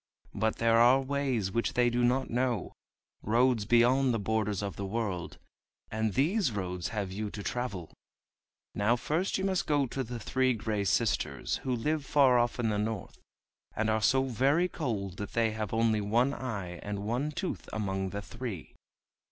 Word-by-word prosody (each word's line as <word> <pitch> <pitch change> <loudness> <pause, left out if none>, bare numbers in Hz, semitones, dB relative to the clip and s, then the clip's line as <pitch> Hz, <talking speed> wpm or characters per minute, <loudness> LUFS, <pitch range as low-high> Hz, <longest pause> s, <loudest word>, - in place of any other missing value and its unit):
But 110 0 0
there 115 0 +3
are 125 +3 +6
ways 135 -7 -1
which 115 +3 0
they 120 -1 +3
do 120 +1 +1
not 125 +2 +2
know, 120 -3 -1 0.5
roads 120 0 +2
beyond 120 +3 +4
the - - -1
borders 105 -1 -1
of 100 - -4
the 100 - -4
world. 100 -5 -3 0.5
And 110 -2 -1
these 170 - +2
roads 90 -4 -3
have 100 -4 -3
you 105 +2 -3
to 100 0 -7
travel. 100 -10 -4 0.8
Now 110 +4 +2
first 160 +10 -1
you 190 - -3
must 190 -2 0
go 145 -2 +2
to 130 +2 -3
the 120 0 -6
Three 130 +3 +1
Gray 105 -2 -2
Sisters, 90 - 0
who 130 -1 -2
live 150 +6 -1
far 130 -3 +4
off 120 +1 0
in 115 -2 +1
the 105 -1 0
north, 105 -2 -4 0.6
and 110 0 +1
are 110 0 +1
so 130 +5 +3
very 135 - +2
cold 105 - -3
that 100 -1 -6
they 115 -1 +2
have 110 -1 -4
only 110 -1 +2
one 120 +7 +2
eye 100 -10 -5
and 100 -1 -4
one 125 +7 -1
tooth 185 +4 -4
among 95 -3 -2
the 100 +1 -5
three. 115 -9 -7
115 Hz, 175 wpm, -30 LUFS, 105-130 Hz, 0.8 s, are